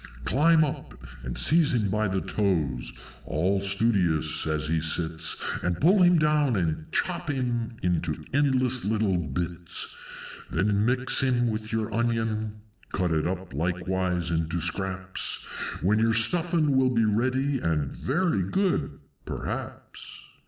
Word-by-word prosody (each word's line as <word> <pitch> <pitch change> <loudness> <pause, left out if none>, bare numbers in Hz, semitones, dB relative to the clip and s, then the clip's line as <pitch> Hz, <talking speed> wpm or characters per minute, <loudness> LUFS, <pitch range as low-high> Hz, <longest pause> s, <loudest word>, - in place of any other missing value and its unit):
Climb 155 +3 +4
up, 145 - -4 0.3
and 60 0 -5
seize 160 -4 +4
him 105 -5 0
by 110 +1 +1
the 95 0 -1
toes, 90 - -1 0.3
all 95 +6 0
studious 95 -7 +1
as 75 -1 -1
he 80 0 0
sits, 80 0 0
And 90 -1 -1
pull 185 +5 +4
him 175 -1 +6
down, 150 -4 +2
and 80 -4 -2
chop - - -2
him 120 -4 -2
into 85 -3 0 0.2
endless 130 -3 +2
little 105 -3 +1
bits! 85 +3 -3 0.5
Then 100 +1 +1
mix 130 +2 +2
him 125 -2 +2
with 110 0 -5
your 110 -1 -2
Onion 110 -2 -1 0.3
(cut 90 -3 0 0.2
up 95 -2 -5
likewise 90 +2 -1
into 80 +1 -1
Scraps), 95 +2 -1 0.4
When 105 +4 +3
your 115 0 +2
Stuffin' 160 +4 +2
will 130 -1 +4
be 115 -3 +2
ready, 130 +6 +1
and 75 -6 -1
very 155 - 0
good 185 - -1 0.3
perhaps." - - -6
105 Hz, 130 wpm, -26 LUFS, 90-130 Hz, 0.5 s, him